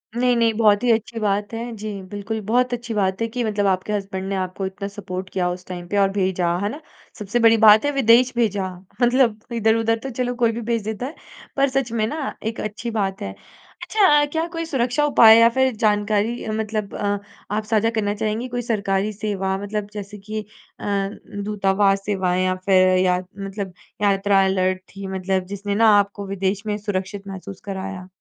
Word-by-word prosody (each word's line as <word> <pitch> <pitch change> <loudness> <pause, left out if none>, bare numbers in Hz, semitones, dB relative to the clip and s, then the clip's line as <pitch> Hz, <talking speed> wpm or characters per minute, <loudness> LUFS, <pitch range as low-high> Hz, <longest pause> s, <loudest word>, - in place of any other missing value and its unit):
नहीं, 245 0 +2
नहीं, 230 -1 +3
बहुत 210 0 +4
ही 245 - +4
अच्छी 225 +1 -1
बात 205 0 -1
है। 235 +1 -4
जी, 210 -2 -6
बिल्कुल। 205 +2 -4
बहुत 250 +1 +2
अच्छी 235 -1 -4
बात 195 0 0
है 230 - +1
कि 240 +2 -3
मतलब 210 -2 0
आपके 190 +2 0
हज़्बन्ड 195 -2 -3
ने 195 - -1
आपको 185 +1 -3
इतना 190 +1 -5
सपोर्ट 190 -2 -6
किया 180 -1 0
उस 180 0 -7
टाइम 175 -1 -7
पे 205 - -2
और 195 -1 +4
भेजा। 185 -3 0
है 205 - 0
ना? 285 - -7 0.4
सबसे 210 +3 -1
बड़ी 230 -1 +6
बात 215 +5 +8
है 290 - +2
विदेश 250 -2 +4
भेजा। 205 -5 +1 0.3
मतलब 245 -3 +3
इधर-उधर 225 0 +2
तो 270 - -4
चलो, 245 0 -2
कोई 235 -2 +2
भी 235 +1 -5
भेज 230 -3 0
देता 220 +3 -4
है, 290 +5 -7 0.4
पर 275 0 +3
सच 260 -2 -1
में 225 -2 0
ना 300 +3 -4
एक 220 +1 -3
अच्छी 215 +3 -4
बात 195 -3 -2
है। 95 - -4 0.5
अच्छा, 300 -9 +4
क्या 320 +3 -2
कोई 330 0 -2
सुरक्षा 260 -2 0
उपाय 225 -6 +8
या 230 0 +7
फिर 260 -1 +3
जानकारी 210 +2 0
मतलब 215 -1 -3
अ, 205 0 -1 0.4
आप 215 - -1
साझा 220 +1 +1
करना 205 -2 0
चाहेंगी? 215 +4 -2
कोई 245 0 -3
सरकारी 205 -3 0
सेवा 195 -2 -2
मतलब 205 +1 -4
जैसे 205 0 -7
कि 215 +2 -5 0.4
अ, - - -7 0.6
दूतावास 195 -1 +1
सेवाएँ 185 -3 0
या 185 - +1
फिर 185 -1 +5
या 185 -1 +3 0.2
मतलब 195 -1 -5 0.3
यात्रा 200 -1 +3
अलर्ट 185 -1 +1
थी 195 0 -6
मतलब 190 0 -1
जिसने 200 0 -3
ना 225 +1 +5
आपको 200 0 -1
विदेश 195 +1 -2
में 210 -1 -1
सुरक्षित 200 -1 -4
महसूस 195 0 -8
कराया? 190 -2 -5
210 Hz, 195 wpm, -22 LUFS, 195-230 Hz, 0.6 s, बात